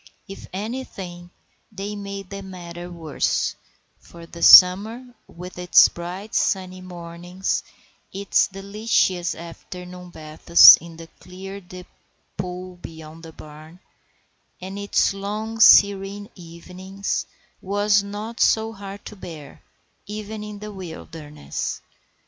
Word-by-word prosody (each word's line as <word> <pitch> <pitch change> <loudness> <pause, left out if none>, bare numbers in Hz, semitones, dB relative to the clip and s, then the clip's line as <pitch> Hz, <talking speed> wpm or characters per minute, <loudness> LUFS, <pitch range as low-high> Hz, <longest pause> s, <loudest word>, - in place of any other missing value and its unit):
If 195 - -10
anything, 190 -5 -7 0.4
they 205 0 -6
made 200 -1 -7
the 200 0 -6
matter 175 -2 -9
worse; 165 -4 -2 0.5
for 170 -1 -14
the 170 0 -12
summer, 220 +7 +7
with 180 +1 -10
its 180 0 +6
bright 180 +5 -8
sunny 185 -1 -1
mornings, 175 +1 -4 0.5
its 200 +1 +1
delicious 195 -2 -1
afternoon 180 +2 -10
baths 160 +1 +7
in 165 0 -13
the 165 - -10
clear 195 +2 -10
deep 180 0 -12 0.5
pool 180 -1 -6
beyond 160 -1 -11
the 165 -1 -11
barn, 155 +3 -14 0.8
and 190 +2 -7
its 200 0 +1
long 210 +3 -5
serene 200 -1 +5
evenings, 180 +3 -6 0.3
was 205 +1 +2
not 210 +3 -7
so 220 0 +2
hard 200 -1 -10
to 210 - -9
bear, 165 -6 -11 0.5
even 210 +1 -6
in 210 -1 -8
the 210 +1 -8
wilderness. 160 -5 -7
185 Hz, 115 wpm, -22 LUFS, 175-200 Hz, 0.8 s, summer